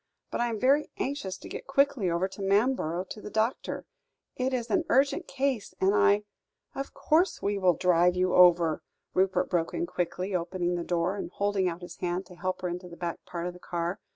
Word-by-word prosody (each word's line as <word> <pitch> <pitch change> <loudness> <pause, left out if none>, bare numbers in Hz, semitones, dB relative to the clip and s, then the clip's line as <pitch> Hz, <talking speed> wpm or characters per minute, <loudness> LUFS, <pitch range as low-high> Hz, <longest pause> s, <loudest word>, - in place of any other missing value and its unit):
But - - -1
I 240 - +1
am 225 -2 -3
very 275 +5 +3
anxious 230 -9 -3
to - - -11
get - - -7
quickly 275 -7 +2
over 170 +2 +1
to 195 - -10
Manborough 195 -4 +1
to 210 - -7
the - - -7
doctor; 220 +4 -1 0.5
it 255 +1 0
is 240 -2 -2
an 360 -3 +3
urgent 275 +2 +2
case, 260 -8 -1
and 190 +1 +3
I 205 0 +4 0.3
" - - -52
"Of 275 - -6
course 335 +5 +2
we 200 0 0
will 180 -3 +4
drive 180 0 +3
you 185 0 +1
over," 175 -3 +5 0.3
Rupert 190 0 +2
broke 170 -2 -1
in 340 - 0
quickly, 185 - -3
opening 175 0 -1
the 175 -1 -2
door, 175 +3 0
and 195 - -4
holding 200 -1 0
out 175 +1 -7
his 175 - -9
hand 180 +1 -2
to 180 0 -14
help 185 +1 -3
her - - +1
into 180 +1 -5
the 170 - -11
back 170 -1 -4
part 170 -1 -4
of 180 - -3
the 180 - -13
car. 175 +2 -3
185 Hz, 215 wpm, -28 LUFS, 175-230 Hz, 0.5 s, over